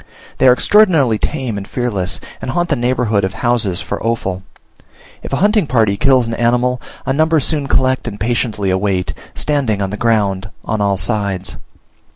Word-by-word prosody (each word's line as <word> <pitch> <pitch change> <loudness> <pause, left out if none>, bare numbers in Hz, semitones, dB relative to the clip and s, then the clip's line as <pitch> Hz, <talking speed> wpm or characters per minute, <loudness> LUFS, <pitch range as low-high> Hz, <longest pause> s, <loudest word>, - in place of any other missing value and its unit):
They 130 - +5
are - - +8
extraordinarily 155 - +3
tame 130 -8 -2
and 100 - -9
fearless, 105 -8 -1 0.2
and - - -5
haunt 175 +5 -1
the 150 - +2
neighborhood 120 -4 0
of 95 +2 -2
houses 110 -6 0
for - - -5
offal. 100 -5 -2 0.8
If - - -8
a - - +1
hunting 205 +1 +2
party 110 -5 +2
kills 130 +2 +3
an 115 - -4
animal, 125 +2 +1 0.2
a 135 - 0
number 160 +2 +3
soon 145 0 -1
collect 130 -1 +1
and 105 -3 -6
patiently 110 -3 -1
await, 95 -1 -1 0.2
standing 135 -9 0
on 95 -1 -2
the 105 - -4
ground 105 -4 0 0.2
on 110 - -1
all 100 -1 +1
sides. 100 -3 -2
115 Hz, 175 wpm, -16 LUFS, 100-130 Hz, 0.8 s, are